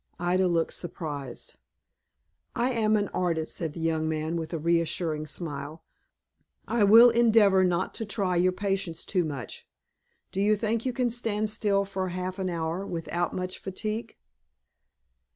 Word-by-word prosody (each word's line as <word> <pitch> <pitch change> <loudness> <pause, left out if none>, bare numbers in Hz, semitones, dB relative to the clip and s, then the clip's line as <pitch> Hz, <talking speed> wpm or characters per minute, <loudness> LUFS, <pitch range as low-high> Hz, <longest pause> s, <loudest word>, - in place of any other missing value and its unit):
Ida 180 +2 +2
looked 165 -2 0
surprised. 145 -7 -6 1.0
"I 245 +2 +1
am 220 -3 +2
an 205 -1 +1
artist," 170 -3 -1
said 160 -3 -3
the 170 - -8
young 160 -1 0
man, 160 +1 -2
with 160 -1 -4
a 165 - -2
reassuring 165 -1 0
smile. 150 -1 -5 0.8
"I 235 -3 +2
will 230 +4 +8
endeavor 220 -5 +5
not 180 0 0
to - - -1
try 195 -4 -1
your 180 +1 +3
patience 195 -3 -2
too 185 -3 +1
much. 140 -6 -6 0.6
Do 195 - -2
you 210 +1 +4
think 225 +3 -1
you - - +1
can 250 -1 0
stand 215 -3 0
still 205 -2 +2
for 190 -1 -3
half 185 +2 -4
an 185 -1 -1
hour, 165 +2 -2
without 175 -1 -3
much 185 0 -4
fatigue?" 215 +4 -4
185 Hz, 150 wpm, -27 LUFS, 165-210 Hz, 1.0 s, will